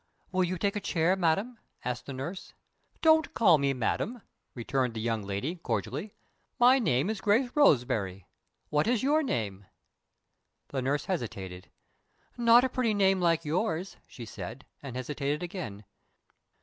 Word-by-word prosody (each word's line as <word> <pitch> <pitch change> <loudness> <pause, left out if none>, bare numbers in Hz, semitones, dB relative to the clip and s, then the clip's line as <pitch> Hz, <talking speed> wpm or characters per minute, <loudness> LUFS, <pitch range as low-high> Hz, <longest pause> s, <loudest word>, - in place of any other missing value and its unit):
"Will 185 0 +2
you 180 +1 -1
take 200 +3 0
a - - 0
chair, 175 -1 +1
madam?" 195 +7 0 0.3
asked 125 0 -3
the 140 - -5
nurse. 165 +9 -6 0.5
"Don't 315 -1 +4
call 175 -9 +5
me 140 0 +2
'madam,'" 195 - -2 0.3
returned 125 0 -1
the - - -3
young 115 -1 -1
lady, 100 - -3
cordially. 135 - -3 0.5
"My 250 +2 +6
name 135 - +1
is 215 -2 -3
Grace 230 +5 +2
Roseberry. 115 - +2 0.5
What 150 +4 +2
is 240 -1 +1
your 300 +3 +3
name?" 100 - -3 1.0
The 135 - -2
nurse 140 +3 -1
hesitated. 95 - -5 0.7
"Not 235 0 +6
a 260 - +1
pretty 240 -4 0
name, 195 -2 +3
like 165 -1 +2
yours," 175 +2 -1
she 120 - -9
said, 110 +5 -8 0.2
and 135 -3 -7
hesitated 145 +4 -2
again. 110 - -6
160 Hz, 150 wpm, -29 LUFS, 125-205 Hz, 1.0 s, My